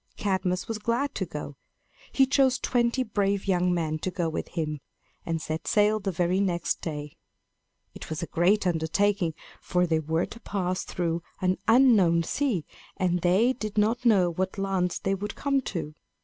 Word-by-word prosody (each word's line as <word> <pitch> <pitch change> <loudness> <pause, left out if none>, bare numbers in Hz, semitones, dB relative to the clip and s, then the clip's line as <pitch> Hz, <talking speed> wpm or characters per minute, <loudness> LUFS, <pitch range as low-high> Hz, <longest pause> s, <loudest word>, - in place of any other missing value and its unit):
Cadmus 185 -2 -1
was 225 -1 -3
glad 235 +6 -1
to - - -3
go. - - -6 0.6
He 270 - +4
chose 265 -1 +3
twenty 245 +1 +1
brave 200 -3 0
young 180 -1 +2
men 160 -3 -1
to 185 - -2
go 175 -2 -1
with 160 - -4
him, 155 -3 -3 0.5
and 165 -1 -1
set 155 0 -5
sail 210 +1 +3
the 195 -1 -2
very 180 +2 +1
next 175 -4 0
day. 150 -3 -5 0.8
It - - -10
was 160 +1 -3
a - - -1
great 190 +6 +2
undertaking; 175 +1 +1 0.3
for 180 -1 +1
they 160 -2 +1
were 160 +2 0
to 230 - -11
pass 185 -4 -2
through 170 -1 -2 0.2
an 185 -1 0
unknown 220 -9 +5
sea, 215 - -1 0.3
and 180 -1 +1
they 195 +9 +3
did 215 -4 -6
not 225 +4 +2
know 195 -7 +4
what 185 +3 -3
lands 190 -2 0
they 195 - -1
would 200 +1 -4
come 275 -1 +1
to. 160 -5 -4
185 Hz, 175 wpm, -27 LUFS, 170-215 Hz, 0.8 s, unknown